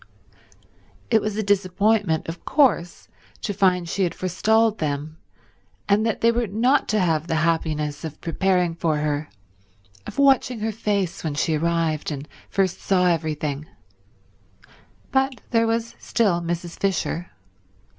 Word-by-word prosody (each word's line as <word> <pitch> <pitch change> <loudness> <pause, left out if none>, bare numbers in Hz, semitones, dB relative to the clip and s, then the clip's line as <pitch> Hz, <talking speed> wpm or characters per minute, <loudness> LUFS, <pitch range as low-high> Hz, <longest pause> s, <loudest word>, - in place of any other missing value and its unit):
It 220 -2 +5
was 215 0 -3
a 215 - 0
disappointment, 200 -2 +1
of 165 +1 -7
course, 265 - +2 0.4
to 205 - -1
find 180 -3 +2
she 185 +4 -2
had 180 -3 0
forestalled 220 +4 +2
them 150 +1 -3 0.7
and 205 +1 +3
that 225 - -2
they 230 - +5
were 235 0 0
not 240 +8 +2
to 215 - +1
have 165 -3 +1
the 165 - 0
happiness 155 -3 -1
of 160 -2 -6
preparing 180 0 +1
for 165 -2 0
her, 150 0 -2 0.8
of - - -8
watching 265 -4 +3
her 220 +1 0
face 200 -4 -2
when 155 -3 -2
she 160 +2 +1
arrived 165 -1 0
and 145 0 -6 0.2
first 190 -2 0
saw 185 -2 +2
everything, 155 -3 -1 1.4
but 265 -1 +1
there 230 -1 +3
was 230 0 -1
still 195 -7 +1
Mrs. 170 0 -4
Fisher. 180 -2 -1
180 Hz, 140 wpm, -23 LUFS, 160-215 Hz, 1.4 s, It